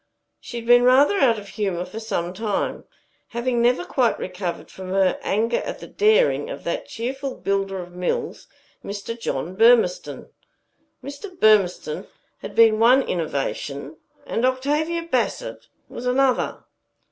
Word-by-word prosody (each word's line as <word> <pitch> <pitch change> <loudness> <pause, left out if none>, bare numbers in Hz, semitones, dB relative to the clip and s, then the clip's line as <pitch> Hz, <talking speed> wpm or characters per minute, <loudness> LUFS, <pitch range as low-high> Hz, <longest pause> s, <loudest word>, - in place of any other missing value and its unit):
She 240 - -8
had 230 - -6
been 245 +1 +6
rather 275 +10 +5
out 235 -4 +4
of 205 -1 -9
humor 190 -5 -2
for 220 - -8
some 180 -6 -3
time, 210 +1 -2 0.5
having 240 0 0
never 245 +8 +2
quite 250 -9 +1
recovered 180 -1 -5
from 185 -1 -9
her 190 0 +2
anger 225 +4 0
at - - -4
the - - -10
daring 450 +3 +2
of - - -7
that - - -3
cheerful 265 +3 -4
builder 195 -1 -1
of 180 -1 -7
mills, 180 0 -3 0.4
Mr. 205 +3 -5
John 180 - -4
Burmistone. 225 -4 +3 0.7
Mr. 355 +7 -9
Burmistone 215 - +2 0.3
had - - -8
been 225 -1 +5
one 250 +4 +5
innovation, 145 -2 -3 0.3
and 230 - -2
Octavia 295 +6 0
Bassett 335 - -2 0.2
was 250 - -6
another. 260 0 +1
230 Hz, 140 wpm, -23 LUFS, 195-265 Hz, 0.7 s, been